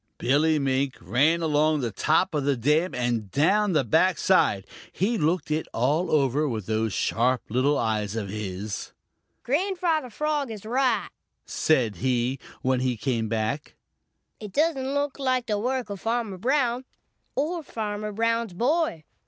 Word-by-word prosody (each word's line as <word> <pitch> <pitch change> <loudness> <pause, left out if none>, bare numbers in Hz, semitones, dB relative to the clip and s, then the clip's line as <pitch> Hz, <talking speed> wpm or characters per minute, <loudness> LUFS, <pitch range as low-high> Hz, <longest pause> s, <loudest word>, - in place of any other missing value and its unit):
Billy 150 +4 +2
Mink 135 -1 0
ran 140 - +2
along 155 0 +2
the 120 -3 -2
top 160 - +1
of 150 -2 0
the 140 0 +2
dam 150 +9 +1
and 120 -4 -1
down 195 - +2
the 150 - +3
back 160 - +3
side. 100 - +3 0.3
He 210 +7 0
looked 165 -4 0
it 155 +1 -1
all 145 +9 +1
over 145 0 +2
with 110 -5 -4
those 110 +1 0
sharp 120 +6 +1
little 130 +6 +2
eyes 110 -2 -1
of 110 -3 -3
his. 100 0 -5 0.5
"Grandfather 330 - 0
Frog 295 +2 -1
is 215 -2 -8
right," 250 +1 +1 0.4
said 125 - +1
he, 125 +4 0 0.2
when 130 0 +2
he 125 -2 0
came 115 -2 -1
back. 115 +7 -2 0.6
"It 210 -3 -8
doesn't 280 -4 +1
look 285 0 -1
like 255 -2 +1
the 210 -3 -1
work 250 -1 -2
of 200 - -6
Farmer 225 -4 -2
Brown 250 +1 +1 0.5
or 325 +6 -1
Farmer 215 -6 -4
Brown's 230 -1 0
boy. 250 - 0
160 Hz, 155 wpm, -26 LUFS, -, 0.6 s, the